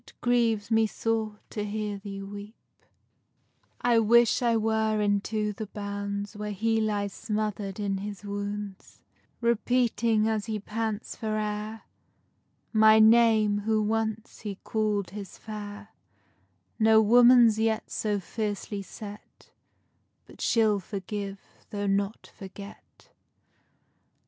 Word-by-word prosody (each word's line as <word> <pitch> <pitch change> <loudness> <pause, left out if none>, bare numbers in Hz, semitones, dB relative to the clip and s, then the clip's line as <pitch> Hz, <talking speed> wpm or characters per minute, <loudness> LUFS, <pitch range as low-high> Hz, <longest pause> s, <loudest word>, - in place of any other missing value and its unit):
_ 210 -3 -1 1.3
I 240 -1 +4
wish 235 +3 +4
I 235 -2 +3
were 220 0 +1
into 210 +1 0
the 215 +1 -6
bounds 200 0 -5
Where 210 0 -4
he 225 +2 +1
lies 205 -2 -1
smother'd 210 -2 -3
in 200 -2 -1
his 205 0 -7
wounds, 205 -1 -6 0.4
Repeating, 235 -1 +2
as 215 -1 -1
he 220 -1 -2
pants 220 +1 -4
for 215 -1 -2
air, 215 +1 -4 0.9
My 220 0 +7
name, 220 -2 +5
whom 215 0 0
once 225 0 -2
he 205 -2 -5
call'd 210 -4 -1
his 200 -2 -8
fair; 210 -1 -8 0.9
No 220 0 +6
woman's 235 0 +6
yet 220 0 0
so 210 -2 -1
fiercely 205 +1 -4
set 205 +1 -11 0.7
But - - -15
she'll 220 -3 +3
forgive, 200 +1 -5 0.3
though 205 -1 -3
not 200 +2 -1
forget. 200 0 -12
215 Hz, 100 wpm, -27 LUFS, 205-220 Hz, 1.3 s, My